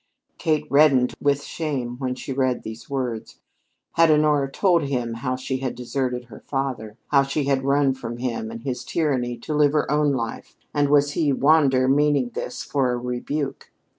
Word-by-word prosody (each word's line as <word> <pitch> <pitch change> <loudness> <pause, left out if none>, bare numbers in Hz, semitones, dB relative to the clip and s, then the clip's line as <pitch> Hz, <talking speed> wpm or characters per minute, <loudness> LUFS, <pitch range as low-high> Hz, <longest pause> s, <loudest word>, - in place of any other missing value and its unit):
Kate 155 -2 +1
reddened 140 -4 +5
with 145 0 +1
shame 135 -8 -3
when 130 -2 -2
she 135 - -5
read 130 -2 0
these 110 +1 -9
words. 125 -5 -4 0.5
Had 165 0 +4
Honora 150 -2 +3
told 175 +1 +3
him 125 -4 -2
how 125 +2 -2
she 130 +1 -3
had 130 -1 -3
deserted 125 0 -2
her 115 -3 -12
father 125 -6 -4
how 140 -1 +5
she 140 +2 -1
had 135 -1 +1
run 140 0 +3
from 120 -3 -6
him 120 -3 -3
and 115 0 -8
his 130 -3 -3
tyranny 130 -7 -1
to 135 +6 -5
live 150 -1 +3
her 150 - +1
own 150 -1 +2
life, 115 -3 -5 0.2
and 145 -1 +2
was 145 0 +4
he, 150 -2 +1
Wander, 135 -2 +4
meaning 140 -2 +2
this - - -5
for 135 -3 0
a 125 - -1
rebuke? 125 +4 -4
135 Hz, 180 wpm, -23 LUFS, 125-145 Hz, 0.5 s, reddened